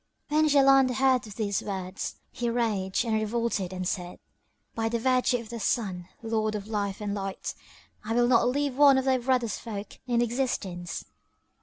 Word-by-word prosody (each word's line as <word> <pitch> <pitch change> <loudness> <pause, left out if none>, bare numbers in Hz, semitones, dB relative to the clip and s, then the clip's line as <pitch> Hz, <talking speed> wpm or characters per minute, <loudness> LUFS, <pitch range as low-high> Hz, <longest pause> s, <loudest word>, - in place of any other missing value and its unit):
When 310 +1 +3
Jaland 270 -3 +5
heard 260 -1 +3
these 205 -1 -2
words 190 -1 -4 0.2
he 240 -1 -2
raged 220 -3 0
and 225 - 0
revolted 215 -3 -1
and 185 -1 -3
said, 180 -2 -3 0.6
"By 225 0 -1
the 235 - 0
virtue 255 +1 +2
of 230 -2 -9
the 235 0 -5
Sun, 190 -5 -1
Lord 220 -1 0
of 205 -1 -4
Life 205 -2 -3
and 205 -1 -2
Light, 195 -1 -4 0.5
I 225 +2 -2
will 240 0 +4
not 240 -1 +4
leave 280 0 -1
one 280 -1 +7
of 265 - 0
thy 260 -1 +3
brother's 245 -3 0
folk 210 -3 -7
in 240 -1 +2
existence! 225 -8 -2
230 Hz, 170 wpm, -27 LUFS, 200-250 Hz, 0.6 s, one